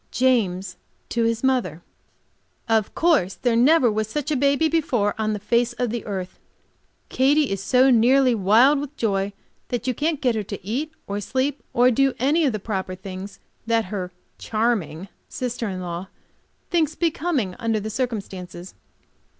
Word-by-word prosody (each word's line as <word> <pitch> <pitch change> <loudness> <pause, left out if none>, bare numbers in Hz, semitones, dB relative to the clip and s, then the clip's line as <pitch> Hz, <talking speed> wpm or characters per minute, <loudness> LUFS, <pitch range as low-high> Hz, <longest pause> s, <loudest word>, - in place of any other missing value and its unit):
James 195 -8 +1 0.3
to 235 -1 0
his 230 +1 -1
mother: 225 - 0 0.8
Of 220 -3 +1
course 295 - +2
there 240 -2 0
never 255 0 +5
was 215 0 -1
such 295 +5 -3
a - - +2
baby 280 +3 +2
before 255 -10 +1
on 215 0 0
the - - -2
face 235 +4 +1
of 245 -2 -2
the 235 -1 -3
earth. 185 -3 -5 0.7
Katy 280 +1 +2
is 195 -1 -2
so 255 +5 +4
nearly 255 +2 +4
wild 230 +8 +4
with 290 +1 -7
joy, 200 -3 0 0.4
that 245 -3 -3
you 255 - +1
can't 300 +3 -1
get 250 -4 +1
her 220 - -1
to 200 -2 -8
eat 270 +9 -2
or 200 +1 -4
sleep 265 +6 -1
or 245 +1 +4
do 270 +2 +2
any 300 +5 +2
of 270 - +2
the 215 - -2
proper 190 -3 -4
things 190 +1 -8 0.3
that 230 -1 +2
her 185 -3 -3 0.3
charming 215 -7 -1 0.2
sister 245 -3 -3
in 185 -1 -5
law 175 +1 -5 0.6
thinks 320 -3 +1
becoming 305 - -1
under 225 -2 0
the 215 +1 -5
circumstances. 195 -7 -5
230 Hz, 165 wpm, -23 LUFS, 200-265 Hz, 0.8 s, never